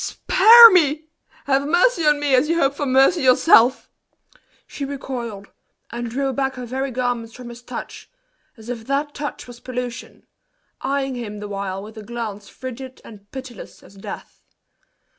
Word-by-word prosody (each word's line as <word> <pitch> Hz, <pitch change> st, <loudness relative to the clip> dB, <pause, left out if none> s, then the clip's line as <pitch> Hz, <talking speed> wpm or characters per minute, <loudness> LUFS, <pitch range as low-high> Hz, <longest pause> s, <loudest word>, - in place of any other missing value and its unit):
spare 460 Hz, +4 st, +7 dB
me! 310 Hz, -4 st, +2 dB, 0.4 s
Have 275 Hz, 0 st, +1 dB
mercy 350 Hz, +1 st, +2 dB
on 295 Hz, -1 st, +3 dB
me 290 Hz, -2 st, 0 dB
as 260 Hz, +4 st, +3 dB
you 335 Hz, -, +1 dB
hope 275 Hz, -3 st, +2 dB
for 285 Hz, 0 st, -4 dB
mercy 270 Hz, +7 st, +3 dB
yourself!" 255 Hz, -1 st, +4 dB, 0.8 s
She 285 Hz, -, -8 dB
recoiled, 245 Hz, -7 st, -6 dB, 0.4 s
and 235 Hz, 0 st, -5 dB
drew 270 Hz, +3 st, -2 dB
back 270 Hz, 0 st, -2 dB
her 250 Hz, -1 st, -7 dB
very 265 Hz, +3 st, -3 dB
garments 245 Hz, -2 st, -3 dB
from 245 Hz, -1 st, -10 dB
his 240 Hz, 0 st, -11 dB
touch, 245 Hz, -, -9 dB, 0.5 s
as 220 Hz, 0 st, -14 dB
if 235 Hz, -2 st, -7 dB
that 285 Hz, +2 st, -2 dB
touch 290 Hz, 0 st, -6 dB
was 245 Hz, -1 st, -13 dB
pollution, 250 Hz, 0 st, -7 dB, 0.6 s
eyeing 270 Hz, 0 st, -2 dB
him 225 Hz, -4 st, -6 dB
the 210 Hz, -, -7 dB
while 195 Hz, -1 st, -5 dB
with 220 Hz, +1 st, -11 dB
a -, -, -10 dB
glance 215 Hz, -3 st, -7 dB
frigid 260 Hz, 0 st, -9 dB
and 205 Hz, -2 st, -15 dB
pitiless 260 Hz, -2 st, -10 dB
as -, -, -17 dB
death. 195 Hz, -, -10 dB
255 Hz, 160 wpm, -21 LUFS, 235-280 Hz, 0.8 s, spare